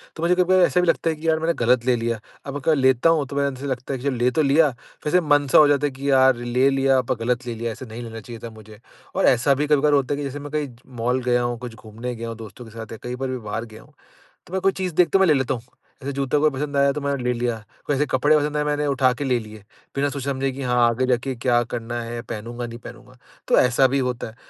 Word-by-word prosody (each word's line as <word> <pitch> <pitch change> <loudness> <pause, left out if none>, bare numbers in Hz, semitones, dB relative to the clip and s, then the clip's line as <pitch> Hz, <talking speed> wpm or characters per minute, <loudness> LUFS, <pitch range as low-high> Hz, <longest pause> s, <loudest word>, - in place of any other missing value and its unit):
तो 160 - -6
मुझे 175 +1 +3
कभी-कभी 185 +1 +3
ऐसा 180 0 +3
भी 180 - 0
लगता 165 - +2
है 160 - -1
कि 160 +2 -7
यार 160 0 +3
मैंने 165 +1 +1
ग़लत 120 0 +3
ले 125 -1 +3
लिया, 115 -1 -2 0.3
अब 140 0 -6
अगर 150 +3 +1
लेता 130 +2 +3
हूँ 155 -3 +2
तो 140 +1 -2
ऐसे 140 0 -3
लगता 130 +1 -3
है - - -2
कि - - -11
जब 140 - +1
ले 125 +1 +1
तो 155 - +1
लिया, 150 +2 +4 0.3
कैसे 180 +4 +3
मन-सा 145 -3 +3
हो 150 - +8
जाता 145 0 +2
है - - -5
कि 135 +2 -4
यार 130 -1 +5
ले 120 +3 +2
लिया 135 -1 +3
पर - - +1
ग़लत 125 +1 -1
ले 120 - -2
लिया, 115 +1 -3
ऐसा 130 - -8
नहीं 115 +2 -7
लेना 115 -1 -7
चाहिए 115 +2 -9
था 115 - -5
मुझे। 110 -1 -14 0.4
और - - +2
ऐसा 130 +3 +4
भी 145 +2 -1
कभी-कभार 150 0 +3
होता 140 -1 +2
है 145 - -2
कि 145 - -4
जैसे 140 +1 -5
मैं 145 0 -8
कहीं 150 -1 -1 0.3
मॉल 125 +3 0
गया 120 0 +2
हूँ, 120 0 -2
कुछ 120 -2 -8
घूमने 115 +3 -7
गया 115 0 -6
हूँ 115 - -7
दोस्तों 115 +2 -10
के 110 - -13
साथ 115 0 -9
या 115 - -7
कहीं 125 0 -4
पर 135 +1 -3
भी 130 - -2
बाहर 115 +3 -3
गया - - -12
हूँ, - - -21 0.5
तो 175 - -16
मैं 190 - 0
कोई 195 - +3
चीज़ 185 -3 -4
देखता 180 +3 +4
हूँ, 190 - +4
मैं 160 - +5
ले - - +2
लेता 130 0 0
हूँ। 115 - -7 0.4
ऐसे 140 +1 -3
जूता 135 +1 0
कोई 155 +1 +3
पसंद 145 +1 -4
आया 140 0 +4
तो 150 - -4
मैंने 140 -2 -2
ले 125 0 +1
लिया, 120 -1 -1 0.3
कोई 145 - +1
ऐसे 150 +2 +1
कपड़े 145 +4 +4
पसंद 150 0 -1
आए 150 - +1
मैंने 150 0 0
उठा 130 -2 +2
के 145 - -2
ले 125 -2 +2
लिए, 110 -1 -11 0.3
बिना 140 +1 +1
सोचे-समझे 135 -1 -2
कि 135 +1 -7
हाँ, 125 -1 0
आगे 125 +2 0
जाके 130 +1 0
क्या 120 -1 +4
करना 120 0 -4
है? 115 +1 -5
पहनूँगा, 120 +2 -6
नहीं 115 0 -8
पहनूँगा? 125 +2 -13 0.3
तो - - +5
ऐसा 125 +1 +4
भी - - +3
होता 125 -1 -4
है। 110 - -14
130 Hz, 290 wpm, -23 LUFS, 120-145 Hz, 0.5 s, हो